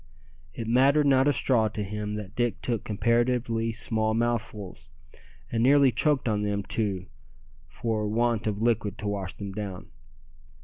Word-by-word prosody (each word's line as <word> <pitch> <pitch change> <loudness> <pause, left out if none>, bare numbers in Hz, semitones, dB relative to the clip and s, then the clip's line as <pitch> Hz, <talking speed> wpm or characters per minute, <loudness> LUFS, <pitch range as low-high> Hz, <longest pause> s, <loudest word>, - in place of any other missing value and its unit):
It 115 - -5
mattered 135 +5 +4
not 135 -1 +4
a - - +5
straw 120 -5 +2
to 105 -1 -4
him 105 +1 -4
that 105 -1 -7
Dick 120 -2 0
took 115 -4 -1
comparatively 115 +1 0
small 110 -1 0
mouthfuls, 110 -9 -3 0.6
and 115 - 0
nearly 135 +1 +5
choked 135 +4 +1
on 105 -2 +1
them 100 -1 -1
too 100 -4 -1 0.6
for 110 +6 -2
want 115 0 0
of 105 +1 -2
liquid 110 -4 0
to 105 - -5
wash 100 -2 -3
them 100 -1 -6
down. 95 -2 -6
110 Hz, 150 wpm, -27 LUFS, 105-120 Hz, 0.6 s, a